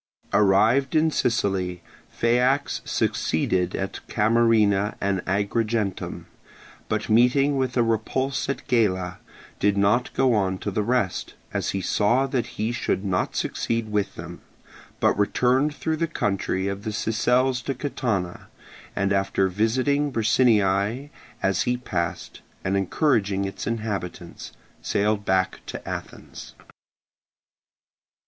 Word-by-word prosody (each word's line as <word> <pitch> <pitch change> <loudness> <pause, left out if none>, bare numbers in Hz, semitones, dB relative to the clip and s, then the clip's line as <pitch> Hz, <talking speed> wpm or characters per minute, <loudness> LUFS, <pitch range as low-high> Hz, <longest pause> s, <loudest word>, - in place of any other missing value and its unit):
Arrived 110 +8 +3
in 160 0 +3
Sicily, 95 - 0 0.3
Phaeax 125 +4 +1
succeeded 90 +3 0
at 95 0 -4
Camarina 110 -2 +3
and 100 -2 -1
Agrigentum, 105 +1 -1 0.6
but 110 0 -1
meeting 125 +5 +4
with 130 -2 -1
a 120 - +4
repulse 130 +5 -1
at 140 - -4
Gela 95 -6 +1 0.4
did 100 0 +2
not 105 +5 +2
go 130 -2 +3
on 95 -3 +1
to 100 - -4
the 105 - 0
rest, 105 -3 -1 0.2
as - - -1
he 95 - -2
saw 115 +8 +2
that 130 -3 -1
he 110 +2 0
should 105 -4 -1
not 90 -2 -1
succeed 115 -2 -2
with 105 -1 -1
them, - - -9 0.6
but - - +3
returned 130 +8 +2
through 160 0 -2
the 165 +1 0
country 95 - -1
of 100 +1 -4
the 110 - -3
Sicels 125 +4 +1
to 135 - -2
Catana, 115 -10 -3 0.5
and 100 0 +1
after 95 0 +1
visiting 130 +9 +1
Bricinniae 110 +1 +2 0.3
as 95 -1 +2
he 125 0 0
passed, 85 -9 -4 0.2
and 95 +1 0
encouraging 100 - +1
its 95 - -5
inhabitants, 100 -6 -4 0.3
sailed 105 0 0
back 95 -1 +1
to - - -7
Athens. - - -8
110 Hz, 125 wpm, -24 LUFS, 95-125 Hz, 0.6 s, meeting